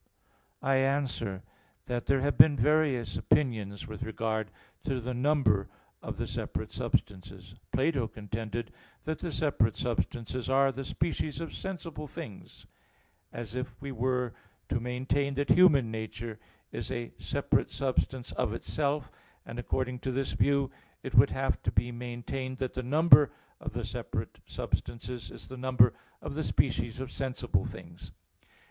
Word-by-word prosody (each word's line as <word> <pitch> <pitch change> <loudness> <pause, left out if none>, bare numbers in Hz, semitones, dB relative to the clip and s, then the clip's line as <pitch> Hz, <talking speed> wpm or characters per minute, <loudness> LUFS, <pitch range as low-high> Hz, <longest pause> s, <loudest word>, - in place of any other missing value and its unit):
I 135 0 +4
answer 135 -7 0 0.4
that, 120 -1 -2
There 135 -1 +3
have 145 +1 +1
been 145 -2 +8
various 135 -5 +2
opinions 110 -8 +1
with 110 0 -8
regard 110 -2 -1 0.3
to 135 -4 -1
the 125 +1 -3
number 125 -7 +3 0.3
of - - -5
the - - -1
separate - - -4
substances. 95 0 -2 0.2
Plato 135 -3 +2
contended 110 +1 -4 0.3
that 155 0 -2
the 170 - -3
separate 130 -9 +2
substances 120 +1 -2
are 135 +1 +5
the 135 +1 -5
species 155 0 -1
of 165 -1 -5
sensible 165 -5 -5
things; 105 -6 -9 0.7
as 115 -1 -6
if 125 0 -4
we 140 0 -5
were 125 -1 0 0.4
to - - +1
maintain 130 +3 0
that 145 +1 -1
human 145 -11 +6
nature 110 0 -5 0.3
is - - -4
a 120 0 -3
separate - - +1
substance 130 0 -1
of 105 - 0
itself: 145 +1 -1 0.3
and 115 - -6
according 125 +1 -1
to 130 - -2
this 135 +1 -1
view 140 -2 +2 0.3
it - - -5
would - - +8
have - - 0
to - - 0
be 120 - +1
maintained 125 +2 -4
that 130 -2 -2
the 130 - -2
number 150 +2 +7 0.3
of - - -5
the - - -2
separate - - -4
substances 120 -4 -3
is - - -10
the 130 - -8
number 125 -2 +5 0.3
of - - -4
the - - -1
species 115 +2 +1
of 130 -1 -5
sensible 130 -2 -1
things. - - -9
125 Hz, 150 wpm, -30 LUFS, 115-140 Hz, 0.7 s, been